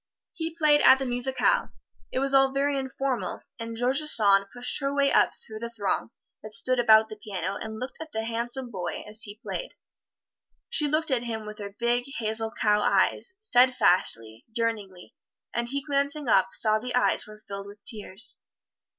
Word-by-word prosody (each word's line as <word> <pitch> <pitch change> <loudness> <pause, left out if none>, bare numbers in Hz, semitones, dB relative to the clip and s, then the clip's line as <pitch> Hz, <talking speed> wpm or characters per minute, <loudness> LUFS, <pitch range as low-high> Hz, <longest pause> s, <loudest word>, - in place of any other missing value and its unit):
He 325 -1 -5
played 300 -2 +4
at 260 - +7
the 270 - -3
musicale 250 +1 +1 0.4
it - - -3
was 275 +1 +1
all 270 0 +5
very 280 +1 0
informal 270 -1 -3 0.2
and 230 0 -5
George 255 +4 +2
Sand 200 -10 +4
pushed 245 0 -4
her 275 -1 -1
way 280 0 +2
up - - +4
through 215 -1 -11
the 235 +1 -5
throng 215 -3 -2 0.3
that 215 0 -6
stood 255 +2 +1
about 220 -2 +6
the 215 - -9
piano 195 -2 -3
and 220 0 -6
looked 255 +3 -7
at 320 -1 -8
the 220 -3 -3
handsome 235 +2 -3
boy 180 -4 -5
as 215 +1 -6
he 205 0 -7
played - - -5 1.0
she 300 - +2
looked 310 +1 0
at 255 -3 +2
him 220 -2 -4
with 210 +1 -9
her 200 -1 -7
big, 240 +1 +1
hazel, 220 0 -1
cow 210 -1 +1
eyes, 375 - +1
steadfastly, 185 - +3
yearningly, 215 -5 -4 0.4
and 235 0 -2
he 280 +1 -3
glancing 285 0 0
up, 190 -4 +4
saw 215 -1 +3
the 250 +2 -4
eyes 250 - +2
were 215 0 -14
filled 200 0 -6
with 205 0 -14
tears. 210 -1 -2
235 Hz, 180 wpm, -26 LUFS, 215-270 Hz, 1.0 s, at